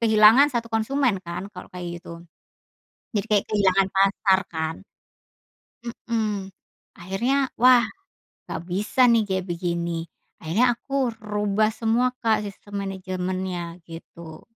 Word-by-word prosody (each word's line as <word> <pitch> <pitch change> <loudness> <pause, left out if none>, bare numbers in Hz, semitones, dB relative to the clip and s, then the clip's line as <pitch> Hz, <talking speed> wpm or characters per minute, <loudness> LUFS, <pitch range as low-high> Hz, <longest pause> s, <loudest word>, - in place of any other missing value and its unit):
kehilangan 220 +5 +7
satu 235 -3 -2
konsumen 225 -2 +1
kan 175 +2 -6
kalau 180 - -9
kayak 175 -1 -6
gitu, 170 0 -10 0.9
jadi 205 - 0
kayak 205 -2 +3
kehilangan 195 -2 +3
pasar 195 0 +3
kan. 160 -1 -3 1.3
Mhm, 210 -4 -1 0.5
akhirnya 245 +10 0
wah 250 0 +7 0.6
nggak - - -5
bisa 210 +7 +3
nih 230 -2 +4
kayak 190 -2 -2
begini 170 -1 -2 0.3
akhirnya 230 +10 +2
aku 275 -3 -1
rubah 210 0 0
semua, 235 +3 +1
Kak, 220 -2 +2
sistem 200 0 -6
manajemennya 185 -2 -4
gitu. 165 -1 -11
200 Hz, 115 wpm, -24 LUFS, 180-225 Hz, 1.3 s, kehilangan